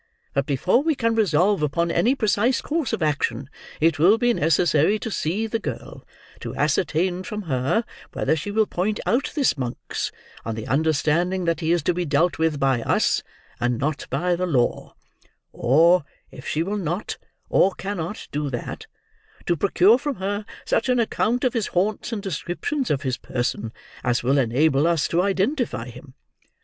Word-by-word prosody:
But, 140 Hz, 0 st, 0 dB
before 165 Hz, -, +2 dB
we 315 Hz, 0 st, +1 dB
can 230 Hz, -3 st, +1 dB
resolve 200 Hz, -3 st, +2 dB
upon 170 Hz, +3 st, 0 dB
any 250 Hz, +9 st, +2 dB
precise 230 Hz, +1 st, +2 dB
course 305 Hz, -5 st, -2 dB
of 170 Hz, -, -1 dB
action, 140 Hz, -3 st, -1 dB, 0.3 s
it 160 Hz, -1 st, +2 dB
will 190 Hz, +8 st, +6 dB
be 240 Hz, 0 st, +2 dB
necessary 160 Hz, +2 st, +3 dB
to 225 Hz, +1 st, -5 dB
see 195 Hz, +5 st, -1 dB
the 225 Hz, +1 st, -2 dB
girl; 145 Hz, -, -7 dB, 0.3 s
to -, -, -6 dB
ascertain 170 Hz, +4 st, 0 dB
from 210 Hz, +3 st, -5 dB
her 140 Hz, -, 0 dB, 0.3 s
whether -, -, +1 dB
she 160 Hz, +6 st, -4 dB
will 215 Hz, +1 st, +2 dB
point 205 Hz, +3 st, -2 dB
out 250 Hz, +3 st, +1 dB
this 275 Hz, -, +1 dB
Monks, 125 Hz, -2 st, -4 dB, 0.3 s
on 115 Hz, -, -4 dB
the 110 Hz, 0 st, -6 dB
understanding 160 Hz, +6 st, +1 dB
that 170 Hz, -1 st, 0 dB
he 165 Hz, -1 st, 0 dB
is 170 Hz, -1 st, +2 dB
to 180 Hz, -, +2 dB
be 180 Hz, +1 st, -1 dB
dealt 160 Hz, +3 st, +1 dB
with 160 Hz, -3 st, +1 dB
by 135 Hz, -3 st, +2 dB
us, -, -, +1 dB, 0.4 s
and 120 Hz, 0 st, 0 dB
not 150 Hz, +4 st, -2 dB
by 180 Hz, 0 st, 0 dB
the 180 Hz, +1 st, -2 dB
law; 125 Hz, -8 st, 0 dB, 0.6 s
or, 165 Hz, +7 st, +4 dB, 0.3 s
if 130 Hz, -, -10 dB
she 155 Hz, -, 0 dB
will 200 Hz, +4 st, -2 dB
not, 180 Hz, +2 st, -3 dB, 0.3 s
or 195 Hz, -, +4 dB
cannot 195 Hz, 0 st, -5 dB
do 145 Hz, 0 st, -2 dB
that, 120 Hz, -3 st, -6 dB, 0.6 s
to 175 Hz, -, +2 dB
procure 200 Hz, -, +4 dB
from 285 Hz, 0 st, -3 dB
her 205 Hz, +2 st, -3 dB, 0.2 s
such -, -, 0 dB
an 250 Hz, -1 st, +3 dB
account 235 Hz, +2 st, 0 dB
of 255 Hz, -, +2 dB
his 230 Hz, -5 st, -1 dB
haunts 205 Hz, +6 st, -1 dB
and 210 Hz, -3 st, -4 dB
description 195 Hz, -, -2 dB
of 140 Hz, -1 st, 0 dB
his 130 Hz, -3 st, -1 dB
person, 120 Hz, -3 st, -3 dB, 0.3 s
as 120 Hz, -1 st, 0 dB
will 135 Hz, +3 st, +3 dB
enable 135 Hz, +5 st, +2 dB
us 170 Hz, -3 st, +2 dB
to 170 Hz, -, +1 dB
identify 200 Hz, -, 0 dB
him. 125 Hz, +2 st, -13 dB
175 Hz, 175 wpm, -23 LUFS, 145-210 Hz, 0.6 s, will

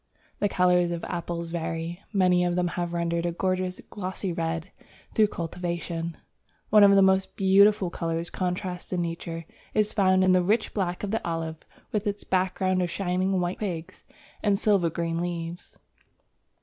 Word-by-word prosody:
The 205 Hz, -, +2 dB
colours 180 Hz, -1 st, +3 dB
of 170 Hz, -1 st, -4 dB
apples 170 Hz, -1 st, -4 dB
vary: 165 Hz, +1 st, -3 dB
many 180 Hz, -3 st, +3 dB
of 175 Hz, 0 st, +1 dB
them 180 Hz, -1 st, +1 dB
have 175 Hz, 0 st, -2 dB
been 170 Hz, -, -5 dB
rendered 170 Hz, 0 st, 0 dB
a -, -, 0 dB
gorgeous, 185 Hz, +1 st, -1 dB
glossy 185 Hz, -2 st, -4 dB
red 165 Hz, +2 st, -3 dB, 0.4 s
through 215 Hz, -1 st, +5 dB
cultivation. 170 Hz, -2 st, -4 dB, 0.5 s
One 210 Hz, -1 st, +8 dB
of 200 Hz, 0 st, +7 dB
the 195 Hz, -, +6 dB
most 190 Hz, 0 st, +2 dB
beautiful 195 Hz, -1 st, +5 dB
colour 165 Hz, 0 st, -2 dB
contrasts 180 Hz, +1 st, -4 dB
in 180 Hz, -2 st, 0 dB
Nature 165 Hz, 0 st, -5 dB, 0.3 s
is 215 Hz, 0 st, +2 dB
found 185 Hz, -2 st, +4 dB
in 185 Hz, -, +5 dB
the 185 Hz, 0 st, +5 dB
rich 215 Hz, +5 st, +1 dB
black 180 Hz, -3 st, -2 dB
of 200 Hz, -, -2 dB
the 225 Hz, -, -1 dB
Olive, 165 Hz, -1 st, -3 dB, 0.3 s
with 210 Hz, 0 st, -1 dB
its 205 Hz, 0 st, -2 dB
background 185 Hz, 0 st, +1 dB
of 175 Hz, -, 0 dB
shining 185 Hz, +1 st, 0 dB
white 175 Hz, +1 st, -2 dB
twigs 180 Hz, -3 st, -5 dB, 0.4 s
and 205 Hz, -2 st, +2 dB
silver 195 Hz, -5 st, +3 dB
green 165 Hz, +1 st, -2 dB
leaves. 170 Hz, -1 st, -5 dB
180 Hz, 165 wpm, -27 LUFS, 170-190 Hz, 0.5 s, One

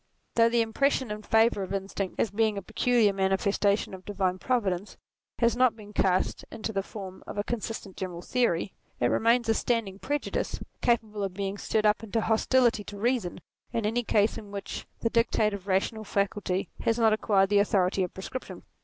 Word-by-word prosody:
Though 230 Hz, 0 st, +5 dB
the 235 Hz, 0 st, +3 dB
impression 260 Hz, +1 st, +1 dB
in 210 Hz, 0 st, -4 dB
favour 225 Hz, -1 st, +3 dB
of 195 Hz, +1 st, -3 dB
instinct 195 Hz, -1 st, -3 dB
as 215 Hz, -, +1 dB
being 215 Hz, 0 st, +1 dB
a 200 Hz, -, -4 dB
peculiar 220 Hz, 0 st, +2 dB
manifestation 195 Hz, +1 st, +1 dB
of 190 Hz, -, -8 dB
the 205 Hz, -, -7 dB
divine 185 Hz, -2 st, 0 dB
purposes, 205 Hz, -6 st, -1 dB, 0.4 s
has 235 Hz, -1 st, +3 dB
not 250 Hz, -2 st, +4 dB
been 210 Hz, -2 st, -12 dB
cast 185 Hz, -2 st, +1 dB
into 220 Hz, 0 st, -5 dB
the 195 Hz, -, 0 dB
form 190 Hz, -2 st, -9 dB
of -, -, -7 dB
a 205 Hz, -, 0 dB
consistent 220 Hz, -4 st, -5 dB
general 180 Hz, -2 st, -5 dB
theory, 205 Hz, -7 st, 0 dB, 0.3 s
it 120 Hz, -, +2 dB
remains 235 Hz, +1 st, +3 dB
a 225 Hz, -, +4 dB
standing 220 Hz, -4 st, -1 dB
prejudice, 290 Hz, +5 st, -2 dB, 0.2 s
capable 220 Hz, -4 st, +1 dB
of 190 Hz, -2 st, -3 dB
being 200 Hz, 0 st, -3 dB
stirred 215 Hz, -1 st, 0 dB
up 210 Hz, +1 st, +3 dB
into 225 Hz, +1 st, -1 dB
hostility 230 Hz, 0 st, +3 dB
to 205 Hz, -, -8 dB
reason 225 Hz, -5 st, -1 dB, 0.3 s
in 230 Hz, -2 st, 0 dB
any 235 Hz, +3 st, +1 dB
case 210 Hz, -1 st, +2 dB
in 210 Hz, -, -12 dB
which 200 Hz, -1 st, -6 dB
the 230 Hz, -, 0 dB
dictate 225 Hz, -2 st, +2 dB
of 195 Hz, -2 st, -6 dB
the -, -, -9 dB
rational 200 Hz, +3 st, 0 dB
faculty 200 Hz, -2 st, -1 dB
has 225 Hz, -, +1 dB
not 225 Hz, -2 st, +4 dB
acquired 200 Hz, -3 st, +2 dB
the 205 Hz, -1 st, +4 dB
authority 195 Hz, -2 st, +2 dB
of 180 Hz, -, -1 dB
prescription. 220 Hz, +7 st, -7 dB
210 Hz, 190 wpm, -28 LUFS, 195-230 Hz, 0.4 s, Though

